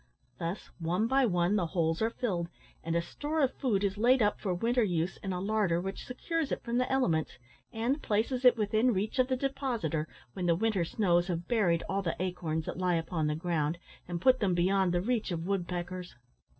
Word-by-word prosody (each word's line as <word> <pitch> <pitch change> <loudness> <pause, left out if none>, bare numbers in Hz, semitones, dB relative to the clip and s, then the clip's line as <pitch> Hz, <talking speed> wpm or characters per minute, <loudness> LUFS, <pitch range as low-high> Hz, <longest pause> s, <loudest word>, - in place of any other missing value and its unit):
Thus 170 +4 -4
one 175 +6 0
by 265 +1 +3
one 180 +1 +2
the 175 -4 0
holes 165 +1 0
are 225 - +3
filled, 190 -8 -2 0.4
and 165 0 -2
a 170 - +2
store 295 - -3
of 270 -2 +2
food 215 -8 0
is 200 0 -1
laid 250 +4 +5
up 210 -2 +2
for 195 - -2
winter 235 +8 +1
use 175 -3 -1
in 195 - -5
a 180 - -2
larder 195 -3 +1
which 195 +2 -5
secures 315 +4 -2
it - - -2
from 240 0 0
the 250 - 0
elements, 175 - +1 0.3
and 240 +6 -1
places 230 +5 0
it 250 -1 +7
within 220 +2 +2
reach 210 +7 -2
of 255 - +4
the 260 -1 0
depositor 240 - -1 0.3
when 180 -2 -2
the 170 - +4
winter 200 -2 +1
snows 175 -2 +2
have 175 -1 -3
buried 180 -8 +2
all 195 +1 0
the 170 -4 -2
acorns 170 -4 -2
that - - -5
lie 180 -1 +2
upon 165 -1 -1
the 150 - 0
ground, 160 -1 -1 0.3
and 175 -1 -3
put 255 +2 +5
them 190 -4 +1
beyond 185 +1 +2
the 175 0 +1
reach 230 +1 0
of 170 -2 -3
woodpeckers. 180 -2 -3
190 Hz, 210 wpm, -30 LUFS, 175-235 Hz, 0.4 s, it